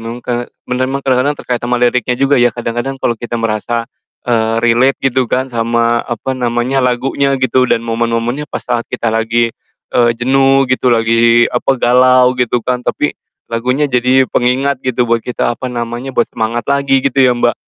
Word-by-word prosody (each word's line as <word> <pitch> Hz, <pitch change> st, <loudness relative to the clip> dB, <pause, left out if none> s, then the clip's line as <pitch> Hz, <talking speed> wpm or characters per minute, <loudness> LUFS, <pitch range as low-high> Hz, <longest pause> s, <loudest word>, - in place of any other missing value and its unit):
meng 115 Hz, +2 st, -8 dB
ke 120 Hz, 0 st, -3 dB, 0.2 s
bener 130 Hz, +1 st, -1 dB
emang 135 Hz, +1 st, -4 dB
kadang-kadang 130 Hz, +2 st, +1 dB
terkait 125 Hz, -3 st, -3 dB
sama 125 Hz, +1 st, -1 dB
liriknya 125 Hz, 0 st, +1 dB
juga 135 Hz, 0 st, +2 dB
ya 120 Hz, -, +5 dB
kadang-kadang 120 Hz, +3 st, -4 dB
kalo 120 Hz, -, 0 dB
kita 120 Hz, 0 st, -4 dB
merasa, 115 Hz, +1 st, -2 dB, 0.4 s
eee, 115 Hz, -1 st, 0 dB
relate 120 Hz, +3 st, +3 dB
gitu 130 Hz, -2 st, +1 dB
kan 130 Hz, -, 0 dB
sama, 115 Hz, 0 st, +1 dB
apa 125 Hz, +2 st, -4 dB
namanya, 125 Hz, +1 st, -1 dB
lagunya 135 Hz, +2 st, 0 dB
gitu 130 Hz, -1 st, +1 dB
dan 115 Hz, -, 0 dB
momen-momennya 115 Hz, +4 st, -2 dB
pas -, -, -6 dB
saat 120 Hz, -1 st, -2 dB
kita 115 Hz, -1 st, -2 dB
lagi, 115 Hz, +1 st, 0 dB, 0.4 s
eee, 120 Hz, -1 st, +3 dB
jenuh 135 Hz, +2 st, +3 dB
gitu, 130 Hz, 0 st, +1 dB
lagi, 115 Hz, 0 st, +3 dB
apa, 130 Hz, +2 st, +1 dB
galau 125 Hz, +1 st, +4 dB
gitu 125 Hz, -2 st, -1 dB
kan. 125 Hz, -1 st, -1 dB
Tapi, -, -, -1 dB, 0.4 s
lagunya 125 Hz, +5 st, 0 dB
jadi 130 Hz, 0 st, +2 dB
pengingat 130 Hz, +2 st, 0 dB
gitu 125 Hz, -1 st, 0 dB
buat 115 Hz, -1 st, +1 dB
kita, 120 Hz, 0 st, -2 dB
apa 130 Hz, +2 st, -5 dB
namanya, 120 Hz, +1 st, -5 dB
buat 120 Hz, -, +4 dB
semangat 115 Hz, +1 st, -2 dB
lagi 140 Hz, -1 st, +1 dB
gitu 135 Hz, 0 st, +1 dB
ya, 125 Hz, -2 st, +4 dB
Mbak? 120 Hz, 0 st, +1 dB
125 Hz, 175 wpm, -14 LUFS, 115-130 Hz, 0.4 s, ya